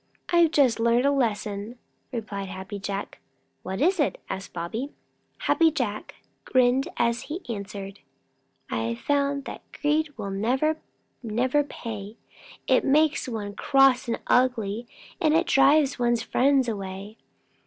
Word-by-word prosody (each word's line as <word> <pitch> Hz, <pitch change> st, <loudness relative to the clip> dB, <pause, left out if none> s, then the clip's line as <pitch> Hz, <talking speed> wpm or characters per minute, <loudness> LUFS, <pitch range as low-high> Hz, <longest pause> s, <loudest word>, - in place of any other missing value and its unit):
"I've 345 Hz, -2 st, +5 dB
just 275 Hz, -7 st, +3 dB
learned 235 Hz, +2 st, +3 dB
a 280 Hz, -, +4 dB
lesson," 215 Hz, -3 st, -1 dB, 0.3 s
replied 205 Hz, -5 st, -5 dB
Happy 190 Hz, +2 st, -6 dB
Jack. 195 Hz, 0 st, -5 dB, 0.4 s
"What 190 Hz, +2 st, -5 dB
is 365 Hz, +4 st, +2 dB
it?" 290 Hz, -, +1 dB
asked 195 Hz, +1 st, -5 dB
Bobby. 220 Hz, -, -4 dB, 0.5 s
Happy 330 Hz, -1 st, +4 dB
Jack 245 Hz, -9 st, -3 dB, 0.3 s
grinned 255 Hz, +1 st, +3 dB
as 235 Hz, 0 st, +1 dB
he 340 Hz, +5 st, -5 dB
answered: 200 Hz, -3 st, -6 dB, 0.7 s
"I've 115 Hz, +1 st, -1 dB
found 280 Hz, -, 0 dB
that -, -, -7 dB
greed 300 Hz, +1 st, 0 dB
will 200 Hz, -3 st, -4 dB
never, 265 Hz, +10 st, 0 dB, 0.4 s
never 250 Hz, +5 st, +1 dB
pay. 220 Hz, -6 st, -7 dB, 0.5 s
It -, -, +3 dB
makes 305 Hz, +1 st, +3 dB
one 210 Hz, -3 st, -4 dB
cross 270 Hz, +1 st, +4 dB
and 230 Hz, -, -1 dB
ugly, 235 Hz, -3 st, +1 dB, 0.3 s
and 310 Hz, -1 st, +3 dB
it 335 Hz, +2 st, +3 dB
drives 275 Hz, 0 st, +4 dB
one's 240 Hz, -1 st, +1 dB
friends 265 Hz, 0 st, +3 dB
away. 200 Hz, 0 st, -5 dB
240 Hz, 130 wpm, -26 LUFS, 205-280 Hz, 0.7 s, I've